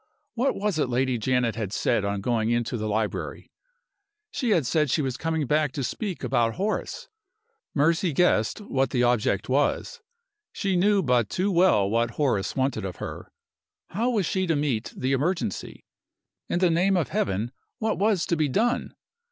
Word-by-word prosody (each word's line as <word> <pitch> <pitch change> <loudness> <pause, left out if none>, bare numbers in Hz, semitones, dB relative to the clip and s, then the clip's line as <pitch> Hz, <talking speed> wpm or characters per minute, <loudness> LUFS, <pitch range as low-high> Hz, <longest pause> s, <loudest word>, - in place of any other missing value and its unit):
What 250 +4 0
was 200 -5 -1
it 140 - +1
Lady 125 0 0
Janet 125 0 +1
had 105 -4 -3
said 105 - +1
on 100 0 -2
going 115 0 0
into 120 0 0
the 110 -2 -2
library? 105 0 -3 0.8
She 265 -5 -2
had 170 -10 +3
said 150 +3 +1
she 150 +4 +1
was 130 -2 -2
coming 160 +2 -1
back 150 +1 +1
to 140 - -3
speak 190 - -4
about 120 -3 +1
Horace. 205 +4 -3 0.7
Mercy 165 +4 +2
guessed 145 - +2
what 135 - 0
the 125 -1 +1
object 120 -5 +1
was; 145 - 0 0.5
she 195 -2 -1
knew 200 +2 +3
but 125 -6 +2
too 190 - 0
well 175 - +4
what 115 +2 0
Horace 105 -10 0
wanted 130 -5 0
of 95 -3 -4
her. - - -7 0.6
How 230 +7 0
was 215 -7 +1
she 185 +3 -1
to 165 - +2
meet 140 -6 -1
the 130 +1 -1
emergency? 135 - -2 0.6
In - - 0
the 180 -1 +3
name 185 +3 +3
of 165 - 0
Heaven, 100 +5 -1 0.3
what 220 -5 -1
was 200 -4 +2
to 170 - 0
be 155 -3 +1
done? 235 - 0
140 Hz, 175 wpm, -26 LUFS, 120-180 Hz, 0.8 s, well